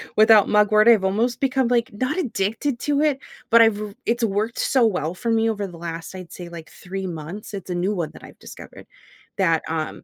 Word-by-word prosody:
without 215 Hz, -1 st, +6 dB
mugwort, 215 Hz, +1 st, +4 dB
I've 225 Hz, -5 st, +6 dB
almost 220 Hz, +6 st, 0 dB
become 265 Hz, -2 st, +1 dB
like 235 Hz, -1 st, +1 dB
not 255 Hz, -, -2 dB
addicted 235 Hz, -, -2 dB
to 290 Hz, -1 st, 0 dB
it, 300 Hz, -3 st, +2 dB, 0.3 s
but 230 Hz, 0 st, +7 dB
I've 215 Hz, -2 st, +2 dB
r 210 Hz, -1 st, -6 dB
it's 235 Hz, +1 st, 0 dB
worked 215 Hz, +2 st, -1 dB
so 255 Hz, -4 st, +3 dB
well 175 Hz, -6 st, -1 dB
for 230 Hz, +5 st, -2 dB
me 225 Hz, 0 st, +2 dB
over 205 Hz, -2 st, -2 dB
the 175 Hz, -, -12 dB
last 165 Hz, 0 st, -7 dB
I'd 185 Hz, -2 st, -10 dB
say 175 Hz, -1 st, -9 dB
like 165 Hz, -2 st, -10 dB
three 190 Hz, +1 st, -7 dB
months, 175 Hz, +6 st, -8 dB
it's 190 Hz, -1 st, -8 dB
a -, -, -2 dB
new 185 Hz, +4 st, -1 dB
one 170 Hz, -4 st, -3 dB
that -, -, -14 dB
I've -, -, -14 dB
discovered -, -, -12 dB, 0.5 s
that, 165 Hz, -5 st, +2 dB
um 160 Hz, -1 st, -4 dB
210 Hz, 215 wpm, -22 LUFS, 180-230 Hz, 0.5 s, but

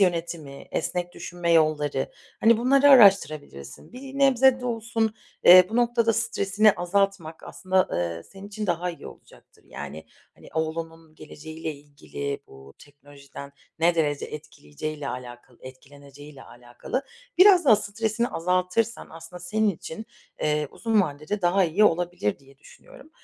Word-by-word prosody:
yönetimi, 165 Hz, -6 st, -2 dB
esnek 175 Hz, 0 st, -3 dB
düşünme 175 Hz, -1 st, -3 dB
yolları, 155 Hz, -4 st, +1 dB, 0.3 s
hani, 225 Hz, 0 st, +4 dB
bunları 275 Hz, +3 st, +4 dB
araştırabilirsin. 155 Hz, -, +3 dB
Bir 270 Hz, +2 st, -9 dB
nebze 265 Hz, -1 st, +4 dB
de 250 Hz, -, -5 dB
olsun, 225 Hz, -1 st, -2 dB, 0.3 s
eee, 180 Hz, +1 st, +9 dB
bu 225 Hz, -, -4 dB
noktada 235 Hz, -1 st, +2 dB
stresini 215 Hz, -2 st, +2 dB
azaltmak 175 Hz, -2 st, -2 dB
aslında, 185 Hz, 0 st, -1 dB
eee, 85 Hz, -1 st, -3 dB
senin 195 Hz, +1 st, -13 dB
için 210 Hz, 0 st, -5 dB
daha 175 Hz, 0 st, -1 dB
iyi 170 Hz, -, -11 dB
olacaktır. -, -, -17 dB
Yani, 75 Hz, +2 st, -9 dB, 0.3 s
hani, -, -, -16 dB
oğlunun 160 Hz, 0 st, -5 dB
geleceğiyle 160 Hz, +1 st, -8 dB
ilgili 140 Hz, -1 st, -7 dB
bu 70 Hz, +1 st, -16 dB
teknolojiden 140 Hz, -1 st, -14 dB, 0.3 s
ne 170 Hz, +1 st, +3 dB
derece 145 Hz, -3 st, -1 dB
etkileyeceğiyle 150 Hz, -, -8 dB
alakalı 120 Hz, -1 st, -9 dB
etkileneceğiyle 140 Hz, +2 st, -14 dB
alakalı 120 Hz, -, -6 dB, 0.4 s
biraz 370 Hz, -2 st, +7 dB
daha 230 Hz, -7 st, +6 dB
stresini 220 Hz, +2 st, -2 dB
azaltırsan 185 Hz, +6 st, -1 dB
aslında 165 Hz, +2 st, -11 dB
senin 210 Hz, +4 st, 0 dB
için, 185 Hz, +4 st, -8 dB, 0.4 s
eee, 150 Hz, -1 st, 0 dB
uzun 225 Hz, -2 st, +1 dB
vadede 155 Hz, +5 st, -5 dB
daha 185 Hz, +2 st, +3 dB
iyi 180 Hz, +6 st, +2 dB
olabilir 175 Hz, -, 0 dB
diye 135 Hz, 0 st, -22 dB
düşünüyorum. -, -, -17 dB
170 Hz, 130 wpm, -24 LUFS, 145-215 Hz, 0.4 s, eee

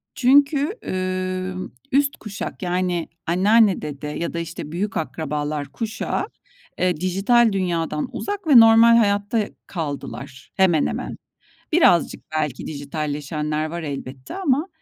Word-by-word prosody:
Çünkü, 285 Hz, -, +3 dB
ımm, 185 Hz, 0 st, -3 dB, 0.2 s
üst 280 Hz, +1 st, +2 dB
kuşak, 205 Hz, -2 st, -7 dB
yani 180 Hz, -1 st, -1 dB, 0.2 s
anneanne, 200 Hz, +4 st, +4 dB
dede 150 Hz, 0 st, -6 dB
ya 165 Hz, +3 st, -4 dB
da, 170 Hz, -, -2 dB
işte, 165 Hz, -2 st, -6 dB
büyük 195 Hz, +5 st, -2 dB
akrabalar 150 Hz, 0 st, -3 dB
kuşağı, 220 Hz, -, -3 dB, 0.5 s
eee, 180 Hz, -3 st, +1 dB
dijital 195 Hz, +7 st, +3 dB
dünyadan 170 Hz, -5 st, -1 dB
uzak 405 Hz, -3 st, -4 dB
ve 275 Hz, -6 st, +9 dB
normal 225 Hz, +1 st, +7 dB
hayatta 205 Hz, 0 st, +1 dB, 0.2 s
kaldılar 140 Hz, -5 st, -6 dB
hemen 180 Hz, -5 st, +3 dB
hemen. -, -, -4 dB, 0.5 s
Birazcık 305 Hz, -, +4 dB
belki 150 Hz, -5 st, -2 dB
dijitalleşenler 150 Hz, +1 st, -3 dB
var 170 Hz, +2 st, -5 dB
elbette 135 Hz, -3 st, -6 dB
ama 310 Hz, -4 st, +1 dB
185 Hz, 115 wpm, -22 LUFS, 150-225 Hz, 0.5 s, ve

